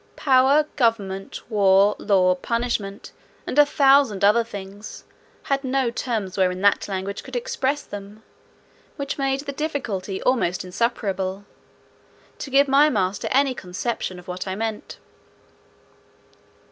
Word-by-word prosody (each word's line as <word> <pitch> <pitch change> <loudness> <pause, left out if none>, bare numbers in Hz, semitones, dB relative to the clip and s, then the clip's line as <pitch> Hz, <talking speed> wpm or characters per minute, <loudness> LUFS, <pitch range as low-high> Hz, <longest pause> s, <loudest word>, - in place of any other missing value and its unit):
Power, 270 +2 +4
government, 200 -6 -1
war, 200 -1 +4
law, 185 -3 +3
punishment, 220 0 -3 0.3
and 290 - 0
a 295 - +7
thousand 275 -8 +4
other 220 +3 +4
things, 200 -1 -9 0.4
had 275 0 -1
no 260 -2 0
terms 220 -6 -3
wherein 185 0 +1
that 200 0 +3
language 195 0 -4
could - - -10
express 465 - -1
them, 205 +2 -10 0.7
which 280 -1 -5
made 270 0 0
the 280 - -5
difficulty 240 -11 -3
almost 190 -9 0
insuperable, 195 -1 -2 0.9
to 280 - -6
give 275 +2 +4
my 280 +3 +5
master 195 -5 -1
any 275 0 +2
conception 190 -1 -4
of 180 +1 -13
what 180 +1 -5
I 190 - -3
meant. 220 0 -5
215 Hz, 125 wpm, -23 LUFS, 195-270 Hz, 0.9 s, a